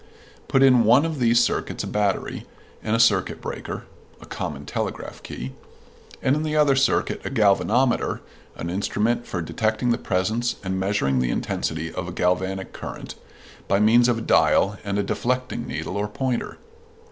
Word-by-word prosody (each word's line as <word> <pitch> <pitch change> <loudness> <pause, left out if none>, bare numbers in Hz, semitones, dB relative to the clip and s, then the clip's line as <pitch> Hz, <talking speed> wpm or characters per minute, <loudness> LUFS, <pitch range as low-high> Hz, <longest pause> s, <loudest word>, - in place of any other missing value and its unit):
Put 135 - +3
in 125 -3 +6
one 125 +7 +5
of 160 -3 -3
these 120 -1 +4
circuits - - -2
a - - -4
battery, 105 -2 -1 0.4
and 110 +1 0
a - - +1
circuit 105 -5 +3
breaker - - -6 0.4
(a - - -12
common - - -5
telegraph - - -4
key), 65 +1 -7 0.7
and 130 - +3
in 150 - -1
the 155 -1 -2
other 150 -3 +4
circuit 135 0 +1
a - - -3
galvanometer 115 +2 +2 0.4
(an 85 - -5
instrument 110 +5 0
for 90 -3 -3
detecting 110 +7 0
the 115 - +1
presence 110 +6 0
and 95 0 -2
measuring 95 -10 +1
the 65 -1 0
intensity 80 +5 -2
of 90 -1 -4
a - - -5
galvanic 95 +2 -1
current, - - -7 0.5
by 100 - +2
means 120 +3 +5
of 120 - +2
a - - -4
dial 105 -2 +3
and 100 -1 -2
a 100 - +1
deflecting 125 +5 -2
needle 90 - -4
or 105 +1 -1
pointer). 125 +3 -3
110 Hz, 170 wpm, -23 LUFS, 95-125 Hz, 0.7 s, in